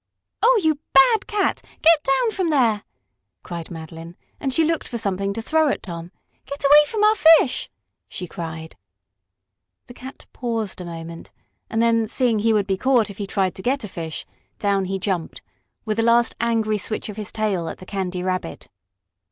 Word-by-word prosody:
"Oh, 485 0 +5
you 310 -2 +2
bad 445 +5 +5
cat, 415 -3 0 0.2
get 325 -1 +6
down 270 - +2
from 375 -5 -1
there!" 235 -8 +2 0.6
cried 170 -2 -7
Madeline, 165 +1 -9 0.2
and 270 - -2
she 325 +5 +2
looked 325 0 -1
for 235 - -4
something 200 -2 -1
to 225 - -5
throw 315 +4 +2
at - - -1
Tom. 170 -1 -7 0.4
"Get 280 +1 -5
away 295 +2 +8
from 425 +3 -1
our 425 0 +6
fish!" 320 -9 +4 0.4
she 180 - -6
cried. 160 -1 -7 1.1
The 245 - -12
cat 260 +2 -11
paused 225 -6 -3
a - - -7
moment, 165 0 -8 0.4
and 225 +1 +1
then, 230 -1 +2
seeing 230 -1 +1
he 225 +2 +2
would 210 -2 +2
be 195 -1 -1
caught 240 -2 +2
if 200 - -14
he 200 - -3
tried 190 -2 0
to - - -9
get 265 +5 -1
a - - -4
fish, 165 -4 -6 0.3
down 200 -2 0
he 195 +1 -2
jumped, 185 -4 -3 0.4
with 215 0 -2
a - - +4
last, 235 +1 +3
angry 225 -2 0
switch 215 - -3
of 210 -1 -8
his 210 -3 -4
tail 200 -6 -1
at - - -7
the 185 - -12
Candy 185 -2 -3
Rabbit. 185 - -4
215 Hz, 185 wpm, -22 LUFS, 185-270 Hz, 1.1 s, away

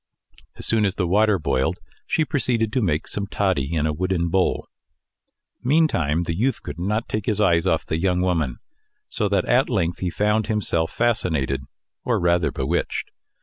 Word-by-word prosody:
As - - -6
soon 110 -1 +2
as 100 -2 +1
the 95 - 0
water 105 +3 +3
boiled, 70 -5 0 0.3
she 160 - +1
proceeded 120 -7 0
to 130 - +1
make 80 -6 0
some 100 -1 -3
toddy 95 -9 0
in 80 -3 0
a 75 - 0
wooden 85 +1 -1
bowl. 95 +2 +1 1.0
Meantime 120 - +2
the 85 -1 -2
youth 125 +8 0
could - - -7
not 105 +6 -1
take 105 -1 -3
his 105 -2 0
eyes 85 -3 +3
off 80 -4 +1
the 80 - -2
young 90 0 +1
woman, 80 -9 0 0.5
so 105 - -1
that 95 -2 +1
at 125 +2 +3
length 85 -4 0
he 90 - -1
found 105 +3 +1
himself 85 -6 0
fascinated, 80 - 0 0.4
or - - +1
rather 85 -1 +2
bewitched. 75 +7 -2
95 Hz, 175 wpm, -23 LUFS, 80-105 Hz, 1.0 s, water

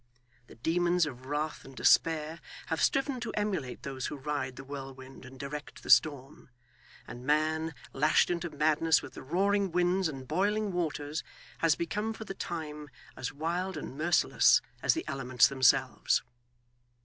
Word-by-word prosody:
The - - -14
demons 175 +6 +2
of 130 -3 -8
wrath 150 +2 -2
and 135 - -13
despair 160 +3 +3 0.3
have 160 -1 -1
striven 270 -1 +1
to 235 - -4
emulate 190 -12 -2
those 135 -2 -4
who 150 - -6
ride 140 -2 -3
the 135 - -9
whirlwind 135 -1 -9
and 130 0 -12
direct 145 +2 -7
the - - 0
storm; 140 -3 +3 0.6
and 120 +2 -9
man, 155 +2 +1 0.2
lashed 150 +5 +3
into 175 0 -2
madness 155 +1 +2
with - - -9
the - - -9
roaring 195 +6 +1
winds 180 +1 +2
and 135 -4 -7
boiling 205 +5 0
waters, 155 -3 -2 0.4
has 165 -2 +3
become 210 +6 -2
for 220 - -8
the 195 - -5
time 150 -5 -6 0.3
as 130 - -4
wild 170 +5 -2
and 140 - -6
merciless 165 +4 +4 0.2
as - - +3
the 330 - -3
elements 130 -3 +3
themselves. 130 -2 +3
155 Hz, 155 wpm, -30 LUFS, 135-175 Hz, 0.6 s, merciless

